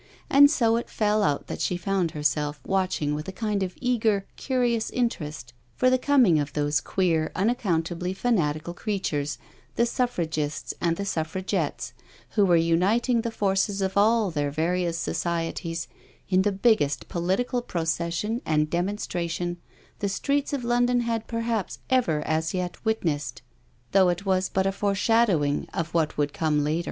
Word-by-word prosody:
And 285 +1 +8
so 230 -6 +2
it 235 - -4
fell 210 0 +1
out 145 -6 +1
that - - -6
she 180 - 0
found 185 -1 0
herself 150 -1 -1
watching 185 -6 0
with 150 +3 -4
a - - -3
kind 210 0 -2
of 185 -1 -3
eager, 220 -5 +1
curious 245 -4 0
interest 150 - -3 0.2
for 255 0 +3
the 255 - +3
coming 250 - +4
of 145 -1 -3
those 145 -1 +1
queer, 165 -4 0
unaccountably 180 -5 0
fanatical 175 -7 0
creatures, 170 -8 -2 0.4
the 235 - +3
Suffragists 165 - -2
and 170 -1 +1
the 200 - -3
Suffragettes, 185 0 -2 0.4
who 210 - +3
were 175 -2 +4
uniting 195 +9 +2
the 230 - -2
forces 200 -2 0
of 190 -1 -1
all 215 -1 +3
their 145 -2 -1
various 170 +3 0
societies 165 0 -2 0.4
in 185 0 +3
the 205 +1 +2
biggest 195 - +2
political 190 +9 -1
procession 170 +4 -2
and 155 -1 +1
demonstration 175 -2 -2 0.4
the 200 - -1
streets 280 +9 0
of 280 -4 -2
London 245 +1 +2
had 230 -2 -2
perhaps 230 -3 -2
ever 175 -13 +2
as 160 +2 0
yet 180 -1 -4
witnessed, 165 - -1 0.5
though 190 -2 +5
it 175 +3 -2
was 185 -1 +1
but 190 0 0
a 195 - +2
foreshadowing 200 -6 +1
of 165 0 -3
what 160 -2 0
would 145 -1 0
come 150 -2 +1
later. 155 +3 0
185 Hz, 155 wpm, -26 LUFS, 160-225 Hz, 0.5 s, And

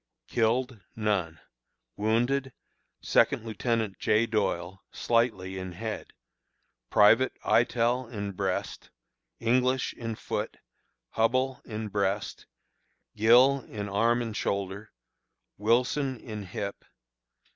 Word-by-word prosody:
Killed: 120 +1 0 0.2
None. 95 -7 -1 0.6
Wounded: 120 +5 0 0.5
Second - - +2
Lieutenant 110 -2 -1
J. 110 +2 +3
Doyle, 95 -4 -2
slightly 105 -6 0
in 95 -1 -6
head; 110 +4 -6 0.8
Private, 115 +5 +5
Eytel, 120 +1 +2
in 100 -3 -4
breast; 95 -1 -3 0.5
English, 125 +2 +1
in 115 -2 -5
foot; - - -4 0.6
Hubbell, 130 +3 +1
in 110 0 -5
breast; 100 0 -2 0.7
Gill, 125 +6 +6
in 105 -3 -6
arm 115 +4 +2
and 115 -2 -5
shoulder; 100 +1 -3 0.7
Wilson, 125 +4 +1
in 105 -4 -7
hip. 100 +2 -5
110 Hz, 95 wpm, -28 LUFS, 100-120 Hz, 0.8 s, Gill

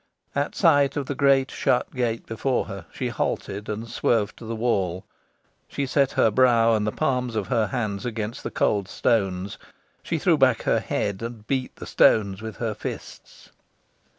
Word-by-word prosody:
At 145 +1 -1
sight 145 -6 +4
of 140 - -1
the 145 - -3
great 135 -1 +3
shut 125 - 0
gate 120 -3 -1
before 120 +3 -1
her, 100 -4 -8
she - - -3
halted, 100 +1 -3
and 110 +2 -4
swerved 115 -2 0
to 115 - -10
the 115 +1 -4
wall. 95 -6 -1 0.6
She 140 - -3
set 140 0 +1
her 110 - +3
brow 115 -1 +4
and 105 -1 +1
the - - +1
palms 125 -5 -1
of 105 -3 -2
her 115 -4 +2
hands 100 -3 -3
against 110 -1 -4
the - - -4
cold 100 -3 0
stones. 95 -3 0 0.4
She - - -2
threw - - +2
back - - +3
her - - +2
head, 100 -1 -2
and 115 -2 -7
beat 130 0 -2
the - - -9
stones 100 -2 +3
with 110 -2 -7
her 115 -2 -2
fists. - - -9
115 Hz, 180 wpm, -24 LUFS, 105-130 Hz, 0.6 s, sight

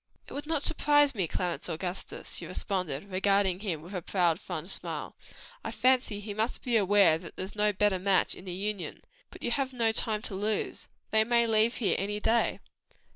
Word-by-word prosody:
"It - - -10
would 290 +1 -5
not 315 -3 0
surprise 290 -2 +4
me, 190 -7 -1
Clarence 175 +1 -2
Augustus," 180 +3 -4
she - - -5
responded, 185 -2 -3
regarding 190 -1 +2
him 175 -7 -3
with 180 +4 -10
a 180 - -2
proud, 175 -1 +1
fond 175 0 -5
smile, - - -3 0.5
"I - - -3
fancy 240 -2 +2
he 205 0 -6
must 220 +4 -2
be 245 -2 0
aware 195 -6 +5
that 170 - -11
there's 190 +3 -5
no 210 0 +3
better 205 -1 +2
match 190 +1 +2
in 185 - -11
the 185 - -5
Union. 200 +1 -4 0.3
But - - -12
you 240 - 0
have 265 +1 -1
no 230 -3 +2
time 220 -1 -1
to 225 - -3
lose, 210 +2 -2 0.2
they 220 0 +5
may 235 +1 +3
leave 225 +1 +3
here 215 - +1
any 205 +2 -2
day." 230 +2 +2
205 Hz, 195 wpm, -29 LUFS, 185-225 Hz, 0.5 s, aware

